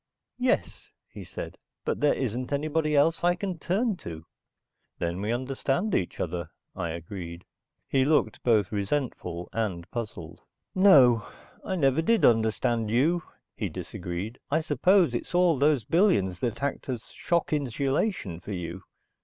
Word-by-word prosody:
"Yes," 255 Hz, +1 st, 0 dB, 0.2 s
he -, -, -9 dB
said. -, -, -8 dB, 0.3 s
"But -, -, -1 dB
there 150 Hz, -, +3 dB
isn't 125 Hz, 0 st, -3 dB
anybody 155 Hz, +1 st, 0 dB
else 160 Hz, +4 st, +3 dB
I 175 Hz, 0 st, +4 dB
can 185 Hz, -2 st, -4 dB
turn 205 Hz, +5 st, 0 dB
to." 80 Hz, -, -8 dB, 0.7 s
"Then 85 Hz, +2 st, -2 dB
we 105 Hz, +2 st, -1 dB
understand 135 Hz, -, -1 dB
each 90 Hz, -, -1 dB
other," 85 Hz, -2 st, -3 dB, 0.3 s
I 85 Hz, -3 st, -2 dB
agreed. 85 Hz, +1 st, -7 dB, 0.4 s
He 135 Hz, -1 st, +2 dB
looked 145 Hz, -6 st, +2 dB
both 110 Hz, -5 st, +2 dB
resentful 100 Hz, -5 st, -2 dB
and 95 Hz, -7 st, -2 dB
puzzled. 90 Hz, -8 st, -6 dB, 0.3 s
"No, 130 Hz, -, +6 dB, 0.4 s
I 190 Hz, -, -2 dB
never 140 Hz, -2 st, +3 dB
did 225 Hz, +6 st, +3 dB
understand 115 Hz, 0 st, +2 dB
you," 150 Hz, +10 st, +2 dB, 0.3 s
he -, -, -2 dB
disagreed. 90 Hz, +6 st, -5 dB
"I 160 Hz, +3 st, +2 dB
suppose 160 Hz, +1 st, +3 dB
it's 120 Hz, +8 st, -3 dB
all 175 Hz, -5 st, +4 dB
those 145 Hz, -4 st, +3 dB
billions 110 Hz, -, +2 dB
that 120 Hz, +4 st, -2 dB
act 140 Hz, -1 st, -2 dB
as 120 Hz, -4 st, -5 dB
shock 170 Hz, -2 st, 0 dB
insulation 135 Hz, -, -1 dB
for 100 Hz, +3 st, -7 dB
you. 90 Hz, 0 st, -5 dB
125 Hz, 145 wpm, -27 LUFS, 95-160 Hz, 0.7 s, No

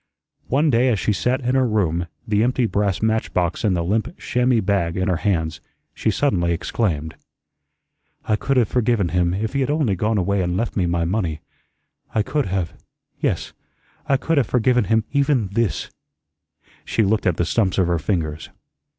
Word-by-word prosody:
One 145 Hz, +4 st, +2 dB
day 120 Hz, +2 st, +3 dB
as 115 Hz, -, +2 dB
she 105 Hz, -, +1 dB
sat 125 Hz, +7 st, 0 dB
in 125 Hz, +1 st, 0 dB
her 130 Hz, -1 st, +3 dB
room, 90 Hz, -6 st, 0 dB, 0.2 s
the 105 Hz, -1 st, +2 dB
empty 125 Hz, +1 st, +2 dB
brass 100 Hz, -2 st, 0 dB
match 110 Hz, 0 st, 0 dB
box 85 Hz, -2 st, 0 dB
and 100 Hz, -5 st, +2 dB
the 85 Hz, -, 0 dB
limp 110 Hz, -, -1 dB
chamois 125 Hz, -1 st, +1 dB
bag 95 Hz, -5 st, 0 dB
in 95 Hz, +1 st, 0 dB
her 90 Hz, -3 st, +1 dB
hands, 85 Hz, -5 st, -1 dB, 0.3 s
she -, -, -1 dB
suddenly 95 Hz, -7 st, +1 dB
exclaimed: 80 Hz, -3 st, -2 dB, 1.1 s
"I 105 Hz, -, +2 dB
could 135 Hz, +5 st, 0 dB
have 120 Hz, -4 st, +4 dB
forgiven 115 Hz, -6 st, +1 dB
him 90 Hz, +1 st, +1 dB
if 110 Hz, +5 st, -2 dB
he 140 Hz, -, 0 dB
had 130 Hz, -, 0 dB
only 145 Hz, -9 st, +1 dB
gone 105 Hz, +4 st, 0 dB
away 100 Hz, +1 st, +1 dB
and 90 Hz, 0 st, -1 dB
left 115 Hz, +3 st, -2 dB
me 90 Hz, -4 st, +1 dB
my 85 Hz, -1 st, 0 dB
money. 85 Hz, -4 st, -1 dB, 0.7 s
I 110 Hz, -, +3 dB
could 145 Hz, +4 st, -1 dB
have 90 Hz, -3 st, -2 dB, 0.5 s
yes, -, -, -1 dB, 0.6 s
I 135 Hz, -, +4 dB
could 165 Hz, +3 st, +1 dB
have 125 Hz, -, +1 dB
forgiven 125 Hz, -1 st, +2 dB
him 110 Hz, +2 st, +2 dB
even 140 Hz, -7 st, +1 dB
THIS" 110 Hz, +1 st, -1 dB, 0.9 s
she 110 Hz, -, 0 dB
looked 105 Hz, +1 st, +1 dB
at 90 Hz, -, +1 dB
the 85 Hz, -, +1 dB
stumps 95 Hz, +1 st, +1 dB
of 95 Hz, -, +3 dB
her 85 Hz, -1 st, 0 dB
fingers. 80 Hz, -2 st, -2 dB
105 Hz, 185 wpm, -21 LUFS, 90-120 Hz, 1.1 s, have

